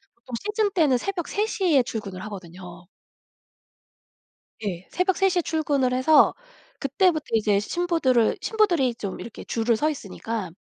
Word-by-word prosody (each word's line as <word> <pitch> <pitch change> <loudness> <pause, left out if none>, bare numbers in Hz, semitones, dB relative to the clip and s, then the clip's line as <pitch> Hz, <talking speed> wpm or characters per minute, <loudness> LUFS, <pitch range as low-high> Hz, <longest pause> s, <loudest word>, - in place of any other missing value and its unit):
보통 235 +1 -8
시즌 420 -1 0
때는 300 -9 +3
새벽 355 +3 -3
3:00 415 -2 -1
에 260 - +5
출근을 200 -5 -6
하거든요. 180 -3 -10 1.8
예. 180 -2 -4
새벽 365 0 0
3:00 385 -2 +2
에 - - +2
출근을 285 -5 0
해서 285 +4 +5 0.5
그때부터 310 +3 +1
이제 210 -2 +3
신부들을 265 - +1
신부들이 345 - +2
좀 200 -4 -5
이렇게 235 - -9
줄을 230 0 0
서 305 - +1
있으니까 220 - -5
260 Hz, 280 characters per minute, -24 LUFS, 215-350 Hz, 1.8 s, 에